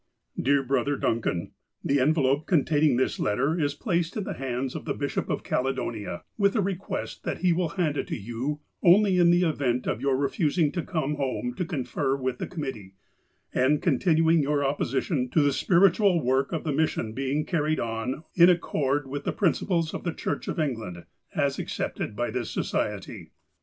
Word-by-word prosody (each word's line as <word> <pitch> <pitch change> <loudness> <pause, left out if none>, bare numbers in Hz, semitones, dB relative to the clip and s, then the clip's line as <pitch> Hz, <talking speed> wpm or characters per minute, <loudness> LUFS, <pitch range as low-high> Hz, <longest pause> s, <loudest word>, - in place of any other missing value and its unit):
" - - -7
Dear 140 0 +3
Brother 135 +2 0
Duncan: 110 -9 -1 0.2
— - - -50
The 140 0 +2
envelope 140 0 +2
containing 150 -4 +3
this 130 - 0
letter 135 +11 +1
is 145 -2 0
placed 170 +1 -1
in 210 - -1
the - - -4
hands 130 0 -3
of - - -6
the - - -2
Bishop - - -2
of - - -2
Caledonia, 115 -7 -2 0.2
with 200 +1 +3
a - - +2
request 195 0 -4
that - - -3
he 180 -2 +4
will 170 -1 0
hand 155 -5 +1
it - - -2
to - - -3
you 120 +7 -4 0.2
only 190 +1 +5
in 175 -1 +6
the 175 +1 +4
event 135 -7 0
of 115 - -2
your 135 -1 +2
refusing 150 +2 +1
to 175 - -2
come 150 -5 -2
home 130 -3 -2
to 180 - -2
confer 135 -3 -1
with 130 -2 -3
the - - -3
committee, 130 - -6 0.6
and 140 +4 +2
con 150 -8 +2
tinuing 165 -1 +4
your 145 0 +1
opposition 135 0 -1
to 155 - +3
the 145 -1 +2
spiritual 180 - +3
work 130 +2 +1
of 165 - -2
the 155 - -1
mission 135 -7 0
being 135 +4 -1
carried 155 -3 0
on 115 +5 -3
in 175 0 +7
accord 145 -5 +1
with 140 +2 -5
the - - -1
principles 170 -3 0
of - - -5
the 175 - -1
Church 145 - -3
of - - -3
Engla?id^a.s 115 - -3
accepted 105 - -3
by 120 +2 -1
this 120 -3 -3
Society. - - -3
145 Hz, 190 wpm, -26 LUFS, 130-170 Hz, 0.6 s, in